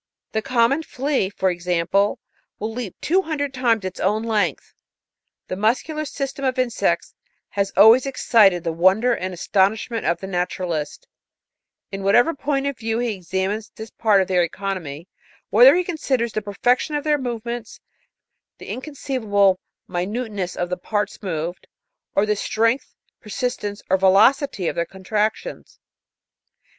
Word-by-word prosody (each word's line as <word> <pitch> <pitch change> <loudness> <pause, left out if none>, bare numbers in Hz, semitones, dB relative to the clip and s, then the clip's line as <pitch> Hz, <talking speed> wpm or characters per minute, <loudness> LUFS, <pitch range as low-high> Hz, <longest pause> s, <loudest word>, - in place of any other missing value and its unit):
The 220 - -1
common 250 +4 +2
flea, 270 -8 -1
forexample, 180 +1 0 0.4
will 220 +2 -4
leap 230 -6 -5
two 370 +4 +2
hundred 285 -5 -3
times 235 -6 +1
its 185 - -5
own 210 +4 +1
length. 210 - -1 0.4
" - - -59
The - - -3
muscular 260 - 0
system 275 -1 -5
of 260 -1 0
insects 255 -2 0 0.4
has 200 -1 -1
always 225 +6 +7
excited 210 -9 +4
the 165 - -1
wonder 190 +9 +3
and 185 +1 -4
astonishment 200 +5 0
of 170 - +1
the - - -7
naturalist, 180 -4 -3 0.8
in 195 0 -5
whatever 240 +11 +4
point 280 -1 -1
of 280 -2 -3
view 225 0 -1
he 240 -2 -1
examines 190 +4 -3
this 220 +1 -9
part 205 -4 +3
of - - -9
their 180 -2 +2
economy, 170 -3 -4 0.4
whether - - +8
he 360 - +2
considers 265 - -1
the 215 - -1
perfection 245 +8 0
of 295 - -1
their 300 -1 +2
move 240 -3 -4
ments, 235 -1 -6 0.8
the - - -11
inconceivable 220 -9 0 0.3
minuteness 195 +1 -3
of 175 0 -3
the 180 - -1
parts 205 +4 -3
moved, 175 -2 -4 0.5
or 200 - +3
the 210 0 +1
strength, 230 +5 0 0.2
persistence, 210 -2 -4
or 190 - +3
velocity 200 - +3
of - - -2
their 170 - +1
contractions. 210 - -3
215 Hz, 145 wpm, -22 LUFS, 190-250 Hz, 0.8 s, whether